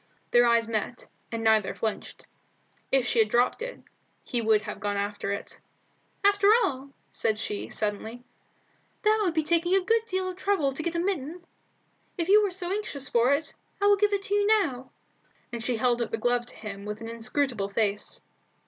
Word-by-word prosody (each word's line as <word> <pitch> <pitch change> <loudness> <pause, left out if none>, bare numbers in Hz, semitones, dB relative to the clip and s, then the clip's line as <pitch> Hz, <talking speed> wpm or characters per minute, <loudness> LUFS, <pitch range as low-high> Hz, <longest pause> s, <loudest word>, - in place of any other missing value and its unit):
Their 240 0 +6
eyes 230 -1 +3
met, 230 +2 -3 0.3
and 230 -1 -3
neither 220 -3 +3
flinched. 220 -2 -4 0.7
If 270 -2 +3
she 245 - +1
had 220 -1 +4
dropped 245 - +2
it, - - -6 0.4
he 240 - -2
would 215 -1 +3
have 210 - -6
gone 205 -1 -2
after 200 0 -2
it. 200 - -6 0.6
"After 405 0 +4 0.2
all," 270 -4 -2 0.2
she 215 -1 -2
said, - - -9
suddenly, 220 +3 -3 0.8
"that 430 +1 +4
would 355 -5 0
be 315 - +2
taking 340 +3 +2
a 385 -2 +2
good 455 +2 +2
deal 375 0 -1
of 365 -1 -5
trouble 370 -8 +1
to 270 - -4
get 340 +1 -3
a - - +1
mitten. 345 -2 -3 0.7
If 340 0 -2
you 420 +2 +7
are - - -3
so 360 -1 -3
anxious 345 -10 -3
for 240 +3 +3
it, 310 +3 -5 0.3
I 405 - +1
will 410 0 +6
give 415 +1 +2
it 400 -1 0
to 395 - -3
you 410 0 +3
now;" 310 - +1 0.6
and 235 -1 -4
she 240 0 0
held 240 +1 +1
out 235 - -1
the 225 - -2
glove 240 +1 0
to - - -11
him 200 -2 -7
with 210 +1 -5
an 225 - -6
inscrutable 230 -2 -1
face. 205 0 -2
255 Hz, 195 wpm, -27 LUFS, 225-370 Hz, 0.8 s, you